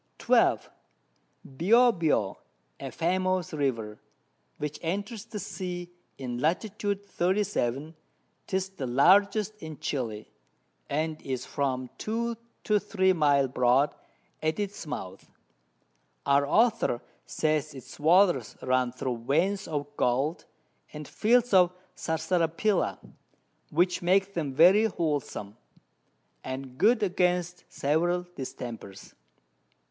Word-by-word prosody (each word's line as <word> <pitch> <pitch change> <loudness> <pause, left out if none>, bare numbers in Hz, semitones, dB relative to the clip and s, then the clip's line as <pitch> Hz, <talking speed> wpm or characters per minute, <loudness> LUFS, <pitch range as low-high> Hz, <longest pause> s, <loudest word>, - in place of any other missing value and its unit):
12. - - +3 0.8
Biobio, 170 - +3 0.4
a - - -5
famous 185 +1 0
River, 115 -8 -2 0.6
which 150 0 -4
enters 200 +5 -3
the 230 - -7
Sea, 180 -2 -5 0.3
in 125 -2 -5
Lat. 160 - +1 0.2
37. 190 - -1 0.5
'tis 190 0 -1
the 140 -9 -5
largest 200 - +4
in 160 -2 -7
Chili, 115 -6 -4 0.6
and 155 +1 -2
is 130 -2 -4
from 130 -2 -2
2 230 +2 -2 0.3
to 210 -1 +2
3 190 -2 +2
Mile 145 -5 +3
broad 130 +3 +2 0.5
at 155 +5 -1
its 200 -5 -4
Mouth. 95 -10 -7 1.0
Our 140 0 +3
Author 220 - +2 0.3
says 155 -1 -1
its 130 - -11
Waters 165 - +3
run 130 -1 +1
thro' 125 0 -2
Veins 170 - 0
of 145 -2 -4
Gold, 135 +7 0 0.5
and 150 -1 -8
Fields 240 +1 +2
of 180 -1 +5 0.2
Sarsaparilla, 165 +4 0 0.7
which 180 +3 +1
make 195 +3 +2
them 155 -6 -2
very 185 +10 +6
wholesom, 145 - -3 0.9
and 130 0 -7
good 220 +4 +4
against 180 -2 0
several 175 +5 0
Distempers. 115 -7 -8
160 Hz, 105 wpm, -28 LUFS, 135-190 Hz, 1.0 s, very